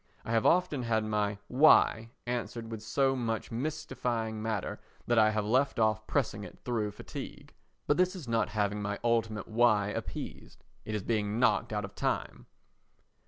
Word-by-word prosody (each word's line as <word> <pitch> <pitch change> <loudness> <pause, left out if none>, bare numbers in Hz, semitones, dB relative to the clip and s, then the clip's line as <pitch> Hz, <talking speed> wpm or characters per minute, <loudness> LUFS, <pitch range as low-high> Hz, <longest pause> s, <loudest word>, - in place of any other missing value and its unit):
I - - -4
have 115 -1 +3
often 175 -6 +3
had 115 -2 +1
my 105 -1 0
"Why" 125 -5 +5 0.2
answered 120 -1 -4
with 110 -2 -5
so 135 +4 +1
much 115 -3 -2
mystifying 115 -5 -2
matter 110 -3 -2 0.3
that 120 -1 +3
I 110 0 +6
have 105 -1 -1
left 130 +6 +2
off 110 -1 +1
pressing 110 -7 -1
it - - -10
through 115 -4 0
fatigue. 105 - -9 0.3
But 145 - +2
this 185 +1 +2
is 165 -9 -8
not 115 -2 +1
having 105 0 -1
my 100 0 -2
ultimate 115 -3 0
"Why?" 110 -3 +3
appeased. - - -6 0.2
It 110 - -3
is 105 - -2
being 105 0 0
knocked 125 - +2
out 105 -1 -1
of 100 - -11
time. - - -2
115 Hz, 165 wpm, -30 LUFS, 105-120 Hz, 0.3 s, I